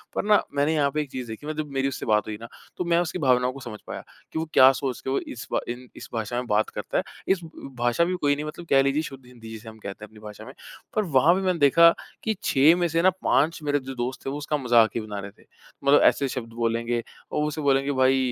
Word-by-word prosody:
पर - - 0
ना 210 -1 +5
मैंने 145 +3 +2
यहाँ 140 -2 +2
पे 150 - 0
एक 145 -3 -7
चीज़ 125 -2 -5
देखी 110 -1 -6 0.2
जब 155 0 -4
मेरी 135 0 0
उससे 135 - -4
बात 105 -1 +2
हुई 110 - -4
ना 115 - -7 0.3
तो - - -1
मैं 170 0 +2
उसकी 175 +1 -2
भावनाओं 125 -3 +3
को 135 - -9
समझ 120 -5 -8
पाया, - - -6 0.3
कि - - -3
वो 160 - -2
क्या 130 +1 +8
सोच 135 -1 -3
के - - -5
वो 135 - +1
इस 120 - -7 0.2
इन 125 +1 -6
इस 130 - -9
भाषा 115 0 -3
में 125 0 -2
बात 105 0 +1
करता - - -4
है। - - +1 0.2
इस 190 - +2 0.4
भाषा 120 +6 +2
भी 180 +1 -1
कोई 145 -1 +3
नहीं 150 +1 -5
मतलब 155 +3 -7
कह 135 - +5
लीजिए 135 +2 +1
शुद्ध 135 -4 -9
हिंदी 120 -3 -13
जिसे 110 0 -9
हम 110 - -13
कहते 100 0 -8
हैं - - -8
अपनी 110 - -16
भाषा 105 0 -10
में। 130 - -10 0.4
पर 215 - +2
वहाँ 155 -1 +4
पे 190 - -1
मैंने 185 -3 0
देखा 160 +4 +7 0.3
कि 220 - 0
6 145 +5 +5
में 175 -1 +1
से 165 0 +1
ना 185 - +6
5 165 +3 +2
मेरे 145 -1 +1
जो 135 0 -8
दोस्त 125 +1 -4
है - - -1
वो 145 - -4
उसका 150 +1 -2
मज़ाक 120 -4 +4
ही 115 - -1
बना 105 -1 -6
रहे 100 0 -7
थे। - - -24 0.4
मतलब 140 +1 +5
ऐसे 140 - +4
शब्द 120 -3 -6
बोलेंगे, 115 0 -1 0.3
और 150 - 0
उसे 150 +1 -4
बोलेंगे 140 0 +2
भई 130 0 +3
135 Hz, 270 wpm, -25 LUFS, 120-150 Hz, 0.4 s, क्या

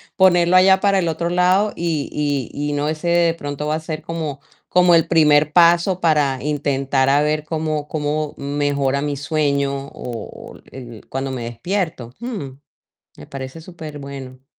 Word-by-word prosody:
ponerlo 180 -1 +5
allá 190 +1 +6
para 200 -1 +2
el 170 - 0
otro 170 +2 -1
lado 185 +4 +2
y 145 -5 -2
y 145 +1 -3
y - - -2
no 145 +2 0
sé, 155 +2 -6
de 170 -1 +3
pronto 145 -2 -5
va 155 +1 0
a - - -2
ser 160 -1 -6
como 155 -4 -5 0.3
como 180 -1 +5
el 165 - +4
primer 150 -2 +4
paso 175 +2 +4
para 150 -6 +2
intentar 140 -2 0
a 145 +1 +4
ver 150 0 0
cómo 155 -2 -3
cómo 150 0 -2
mejora 140 -1 -1
mi 145 -1 -2
sueño 140 -2 -1
o 115 -5 -8
o - - -20 0.5
cuando 135 0 -3
me 125 -2 -4
despierto. 125 - -3
Mm, 215 - -5 0.7
me 75 - -12
parece 135 +3 -7
superbueno. 140 -6 -9
150 Hz, 160 wpm, -20 LUFS, 140-170 Hz, 0.7 s, allá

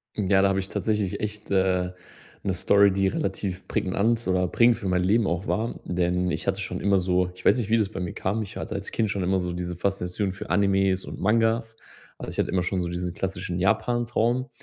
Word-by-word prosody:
Ja, 95 -2 +3
da 100 - +4
habe 95 0 +1
ich 95 0 -5
tatsächlich 105 -1 -1
echt, 105 0 -5
äh, 95 -2 +2 0.5
'ne 95 - 0
Story, 100 +3 +4
die 95 0 +1
relativ 95 0 -3
prägnant 110 +5 0
oder 90 0 +2
prägend 120 +5 +4
für 105 -4 -5
mein 90 -1 +1
Leben 105 +3 +3
auch 85 +4 -2
war. 115 +2 -1
Denn 90 0 0
ich 80 - -4
hatte 100 +1 0
schon 100 - -4
immer 100 -1 +3
so 90 0 +1
ich 90 - -15
weiß - - +5
nicht, 115 -4 -2
wie 115 - +4
das 105 -3 +1
bei 100 - -6
mir 90 -2 -3
kam. 105 +4 -1
Ich 105 +1 -7
hatte - - -5
als 100 0 -5
Kind 110 -2 0
schon 100 -1 -1
immer 95 +1 +1
so 90 -1 -3
diese 90 0 -4
Faszination 95 +1 -2
für 95 - -8
Animes 95 0 +2
und - - -8
Mangas. 115 +1 +1 0.4
Also - - -6
ich - - -6
hatte - - +1
immer 90 -1 +1
schon 90 +1 -1
so 85 - -2
diesen 90 0 -3
klassischen 90 -1 -3
Japan-Traum. 120 +4 +1
95 Hz, 225 wpm, -25 LUFS, 90-105 Hz, 0.5 s, weiß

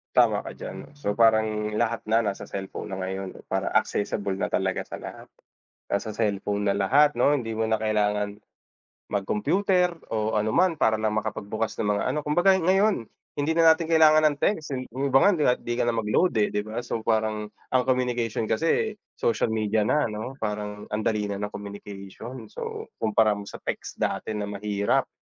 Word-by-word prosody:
Tama - - +4
ka - - -6
diyan - - -7
'no, - - -18
so 105 -8 -3
parang 110 -1 +3
lahat 110 0 -1
na 110 +2 +3
na 100 -3 -2
sa - - -8
cellphone 95 -1 -6
na 95 - -4
ngayon 95 0 -4 0.2
para 95 0 -1
accessible 100 -2 0
na - - 0
talaga - - -1
sa - - -8
lahat. - - -9 0.6
Nasa 100 +2 -1
cellphone 105 -1 -1
na 100 - +2
lahat 140 +10 +4
'no 125 +4 +4
hindi 115 -2 -4
mo 110 - 0
na 110 -1 +1
kailangan 105 -1 0 0.7
mag-computer 180 - +1 0.2
o 110 0 0
ano 105 +1 +1
man 180 +8 +3
para 110 -7 +2
lang 110 -1 0
makapagbukas 110 0 -3
ng 105 - 0
mga 100 - 0
ano 150 - -1
kumbaga 175 +6 +4
ngayon 190 - +2 0.3
hindi 145 +3 +1
na 165 - +3
natin 160 0 +2
kailangan 155 -1 +6
ng 145 -2 +2
text 160 -7 +1
yung 130 +2 -3
iba 135 0 +5
nga 200 - +6 0.2
kahit - - -17
di 120 0 -2
ka - - +2
na 120 - +2
mag-load, 115 - +2
eh, 105 - +3
di 105 0 -2
ba? 110 +2 -4
So, 115 -2 -4
parang 110 -1 0 0.2
ang 130 -1 +2
communication 120 -4 0
kasi 165 - +1 0.2
social 115 -1 0
media 110 0 +1
na 150 -4 +2
'no 110 +5 -5
parang 105 -1 -4
ang 105 +1 -1
dali 105 -2 0
na 100 - -3
ng 105 0 -4
communication. 100 +3 -8
So, - - -6
kumpara 110 -1 +2
mo 100 - -8
sa - - -10
text - - -5
dati 110 - -1
na 105 -1 -3
mahirap 100 0 0
110 Hz, 190 wpm, -26 LUFS, 105-130 Hz, 0.7 s, kailangan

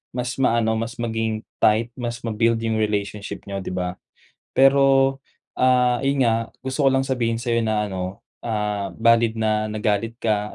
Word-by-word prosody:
mas 125 0 -2
maano 115 -3 +2
mas 115 +1 -3
maging 115 -1 -2 0.2
tight 110 +2 +4
mas 120 0 -4
ma-build 115 0 +1
yung 110 -1 0
relationship 105 -1 -3
niyo, 100 -1 -4
'di 95 - -6
ba? 90 0 -3 0.5
Pero, 135 0 +4 0.4
ah, 125 -1 +3
ayon 140 0 +1
nga 115 -1 +3 0.2
gusto 130 +3 -2
ko - - +7
lang 135 0 +2
sabihin 120 -3 0
sa'yo 115 0 0
na 110 -1 0
ano, 95 +3 -5 0.2
ah, 105 -4 -3
valid 115 0 +3
na 110 -1 0
nagalit 110 +1 -1
ka. 105 -2 0
115 Hz, 160 wpm, -22 LUFS, 105-120 Hz, 0.5 s, ko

